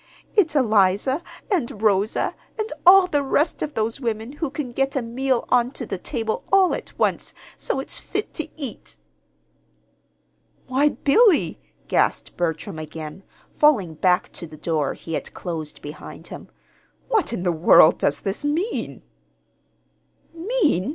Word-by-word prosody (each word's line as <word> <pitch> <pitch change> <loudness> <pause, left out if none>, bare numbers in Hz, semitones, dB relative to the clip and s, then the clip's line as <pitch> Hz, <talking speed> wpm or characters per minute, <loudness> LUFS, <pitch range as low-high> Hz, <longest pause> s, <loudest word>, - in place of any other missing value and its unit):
It's 335 -7 +3
Eliza 220 - +3 0.3
and 260 - -1
Rosa, 205 0 +2 0.2
and 435 +1 -3
all 380 +1 +9
the 295 -5 0
rest 285 +3 0
of 300 - -3
those 225 +4 -1
women 225 0 -3
who 295 +1 -3
can 280 -3 -5
get 270 +3 -1
a 270 - +1
meal 255 +2 -1
on 245 -1 +3
to 245 - -5
the 195 -3 -5
table 225 +2 -3
all 385 -2 +5
at - - -6
once, - - -1 0.2
so - - -2
it's 270 - -5
fit - - -4
to 315 - -4
eat!" 270 -7 -7 1.7
"Why, 270 +3 +2
Billy!" 360 +6 +3 0.3
gasped - - 0
Bertram 160 -2 -3
again, 155 +2 -8 0.3
falling 230 - +3
back 180 +3 +1
to 170 - -8
the 155 0 -12
door 150 -3 -1
he 165 - -8
had - - -4
closed 160 -4 -6
behind 150 +1 -9
him. - - -9 0.6
"What 445 -5 +1
in 195 -7 -3
the 180 - +2
world 160 0 +6
does 145 - 0
this 195 +7 -1
mean?" 325 +10 -2 1.3
"Mean? 335 - 0
240 Hz, 145 wpm, -23 LUFS, 180-300 Hz, 1.7 s, all